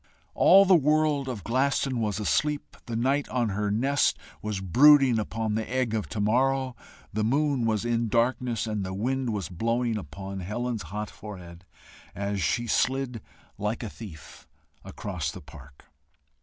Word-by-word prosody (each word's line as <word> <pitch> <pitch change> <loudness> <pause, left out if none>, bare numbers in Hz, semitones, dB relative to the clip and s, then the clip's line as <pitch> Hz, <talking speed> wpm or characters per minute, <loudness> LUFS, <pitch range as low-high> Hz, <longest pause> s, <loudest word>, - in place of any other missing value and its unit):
All 195 +1 +7
the 190 - +5
world 150 -2 +2
of 110 -7 -5
Glaston 130 +1 0
was 105 -2 -1
asleep; 145 +7 -1
the 115 - -4
night 135 +5 +1
on 120 -3 0
her 105 +1 -1
nest 135 +7 +2 0.2
was 105 -2 -3
brooding 130 - +6
upon 110 0 -2
the 110 0 -2
egg 130 -3 0
of 110 -2 -2
to 110 - -4
morrow; 130 +4 +1 0.4
the 110 +1 0
moon 135 0 +1
was 110 0 0
in 115 -1 0
darkness; 120 0 0
and 105 -3 -2
the 95 0 -4
wind 130 +5 -1
was 100 -6 -3
blowing 115 +5 -1
upon 95 +4 -7
Helen's 110 +4 -3
hot 105 +2 -4
forehead, 90 -4 -10 0.5
as 100 0 -2
she 120 +8 0
slid 125 0 0 0.4
like 105 +4 -2
a 110 - -4
thief 90 -10 -11 0.4
across 90 -7 -4
the - - -9
park. 65 +1 -15
115 Hz, 155 wpm, -27 LUFS, 105-130 Hz, 0.5 s, All